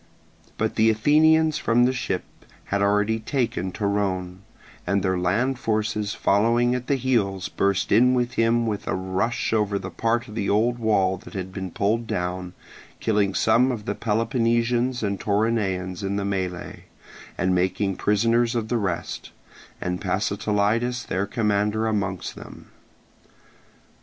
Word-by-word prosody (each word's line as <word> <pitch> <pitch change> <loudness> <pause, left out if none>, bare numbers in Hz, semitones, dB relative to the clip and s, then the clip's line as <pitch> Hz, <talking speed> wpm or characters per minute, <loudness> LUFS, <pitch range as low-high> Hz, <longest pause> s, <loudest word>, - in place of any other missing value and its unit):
But - - -1
the 110 +1 +5
Athenians 155 +7 +4
from 120 +1 +3
the 130 - +2
ships 110 -7 -5 0.2
had 100 0 -1
already 105 +2 +2
taken 110 -6 -2
Torone, 95 -3 -2 0.5
and 100 -1 +1
their 95 -1 +1
land 115 +9 0
forces 105 -1 -1
following 115 +4 +2
at 125 0 -4
his 135 -3 +1
heels 100 -8 0
burst 100 -2 0
in 125 +4 +5
with 125 0 0
him 115 +1 +2
with 105 -3 -3
a - - 0
rush 95 +6 -1
over 105 -2 +1
the 95 -1 -6
part 120 +2 0
of 105 - -10
the 105 -3 -2
old 120 +4 +2
wall 95 -4 +2
that 100 - -13
had 95 -1 -5
been 95 -2 -5
pulled 110 +6 0
down, 90 0 -3 0.4
killing 100 -3 +1
some 120 +4 +3
of 110 -4 -5
the - - -1
Peloponnesians 120 +2 0
and 100 -1 -1
Toronaeans 100 -4 0
in 100 0 -2
the 100 0 -1
melee, 95 -3 -4 0.5
and 95 0 +1
making 95 +2 0
prisoners 115 +4 +2
of 110 -2 -2
the 120 - +1
rest, 95 -5 -4 0.5
and 90 0 -3
Pasitelidas 115 +4 0
their 95 +2 -2
commander 105 0 0
amongst 100 -4 -2
them. - - -12
105 Hz, 145 wpm, -24 LUFS, 95-115 Hz, 0.5 s, the